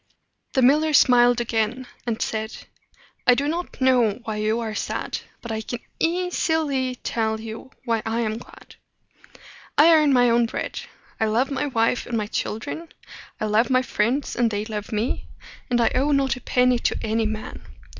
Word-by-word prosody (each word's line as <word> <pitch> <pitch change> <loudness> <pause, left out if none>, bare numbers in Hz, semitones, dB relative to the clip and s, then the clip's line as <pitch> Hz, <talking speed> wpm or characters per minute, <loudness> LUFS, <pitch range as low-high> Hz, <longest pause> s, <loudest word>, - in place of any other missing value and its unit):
The 260 - +3
miller 305 +4 +4
smiled 245 -3 +5
again, 235 +2 -1 0.2
and 230 -1 -1
said, 220 0 -3 0.7
"I 250 - +7
do 280 +3 0
not 340 +3 -4
know 250 -5 +3
why 220 -2 -4
you 215 +2 0
are 225 -2 -3
sad, - - -3 0.2
but 235 - -5
I 220 0 -2
can 240 - -5 0.2
eas 355 +1 0
i 320 - +4
ly 265 -5 -1
tell 220 -1 -1 0.5
why 230 -2 +1
I 225 +1 -1
am 220 0 -2
glad. - - -15 1.0
I 325 +3 +7
earn 305 -2 +5
my 245 -2 +5
own 235 0 +3
bread; - - -4 0.4
I 220 - +2
love 240 +6 +1
my 275 +2 -1
wife 230 -2 0
and 235 - -1
my 215 - -1
children; 225 +10 -4 0.5
I - - -1
love 215 +4 +2
my 255 0 +3
friends, 255 +4 -1
and 240 -1 +2
they 210 0 -2
love 210 -2 -5
me; 220 +3 -2 0.4
and 240 -1 +2
I 230 - +3
owe 275 +4 +2
not 275 -1 +2
a 250 - -10
penny 250 -1 +2
to - - 0
any 220 0 0
man. 215 0 -6
240 Hz, 180 wpm, -23 LUFS, 220-265 Hz, 1.0 s, I